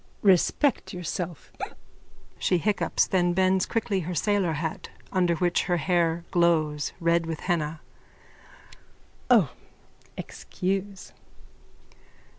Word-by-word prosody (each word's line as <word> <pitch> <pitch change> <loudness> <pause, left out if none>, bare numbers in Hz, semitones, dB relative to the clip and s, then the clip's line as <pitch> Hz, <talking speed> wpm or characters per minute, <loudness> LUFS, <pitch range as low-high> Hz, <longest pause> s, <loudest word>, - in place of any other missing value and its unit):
_ - - -33 0.2
Respect 200 - +3
yourself. 175 -2 -5 0.9
(She 180 - +2
hiccups, 205 +4 +1
then 175 -2 +1
bends 185 +1 +2
quickly 220 -4 0
her 180 0 -4
sailor 195 -1 +1
hat 160 +1 -4 0.2
under 180 -3 +2
which 175 +1 +1
her 175 -1 +1
hair 170 0 +1
glows, 155 -4 +2
red 170 -1 +2
with 160 -2 -4
henna.) 160 -3 -1 1.5
O, 215 - +5 0.7
excuse! 195 +1 -4
175 Hz, 100 wpm, -26 LUFS, 165-190 Hz, 1.5 s, O